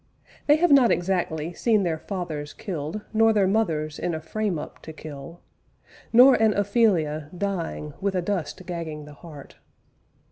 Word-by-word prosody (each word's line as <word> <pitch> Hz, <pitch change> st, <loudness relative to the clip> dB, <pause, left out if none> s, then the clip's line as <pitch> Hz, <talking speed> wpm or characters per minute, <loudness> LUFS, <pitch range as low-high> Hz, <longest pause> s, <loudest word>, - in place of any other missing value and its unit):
They 295 Hz, -, +7 dB
have 345 Hz, +1 st, +2 dB
not 265 Hz, -4 st, +6 dB
exactly 175 Hz, -3 st, -1 dB
seen 215 Hz, +1 st, +2 dB
their 165 Hz, -3 st, -1 dB
fathers 160 Hz, -7 st, -5 dB
killed 170 Hz, +1 st, -5 dB
Nor 225 Hz, 0 st, +4 dB
their 205 Hz, -2 st, +3 dB
mothers 165 Hz, -7 st, 0 dB
in 175 Hz, -, -2 dB
a -, -, -4 dB
frame 195 Hz, +3 st, -2 dB
up 150 Hz, -, -8 dB
to 160 Hz, -, -9 dB
kill, 155 Hz, +1 st, -10 dB, 0.7 s
Nor 250 Hz, +3 st, +8 dB
an 220 Hz, -2 st, +4 dB
Ophelia 185 Hz, -8 st, +1 dB
dying 170 Hz, -6 st, -3 dB
with 195 Hz, -1 st, -1 dB
a 180 Hz, -, +1 dB
dust 185 Hz, -2 st, -3 dB
gagging 165 Hz, -4 st, -5 dB
the 150 Hz, -, -12 dB
heart. 150 Hz, -2 st, -13 dB
175 Hz, 155 wpm, -25 LUFS, 155-210 Hz, 0.7 s, Nor